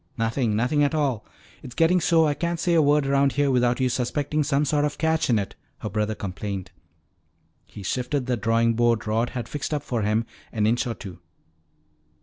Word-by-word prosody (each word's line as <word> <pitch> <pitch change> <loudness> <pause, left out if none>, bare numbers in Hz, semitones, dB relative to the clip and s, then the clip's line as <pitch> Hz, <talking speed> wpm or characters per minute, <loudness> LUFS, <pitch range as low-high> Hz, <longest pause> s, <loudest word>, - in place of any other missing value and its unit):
"Nothing, 115 0 0
nothing 125 +7 +2
at 145 +2 +1
all. 135 -8 -1 0.3
It's 125 - -10
getting 170 +2 +3
so 165 -1 +4
I 150 - +2
can't 170 +2 -2
say 170 +1 +1
a 165 - +5
word 145 0 +3
around 140 0 +2
here 145 -1 +2
without 125 -1 +2
you 130 - +2
suspecting 140 +5 -1
some 145 0 +1
sort 145 +1 +1
of 150 -1 -1
a - - -27
catch 160 -1 +1
in 115 - +4
it," 100 -2 -3 0.2
her 105 - -6
brother 105 +2 -1
complained. 100 -1 -5 1.0
He 105 - -10
shifted 125 - -2
the 125 -1 0
drawing 115 +1 +2
board 120 -1 +1
Rod 115 +3 0
had 120 - -4
fixed 145 +1 -3
up 145 - -3
for 120 -5 -2
him 105 +2 +1 0.3
an 105 -2 0
inch 120 +4 +1
or 115 - -3
two. 95 -5 -10
125 Hz, 205 wpm, -24 LUFS, 115-145 Hz, 1.0 s, a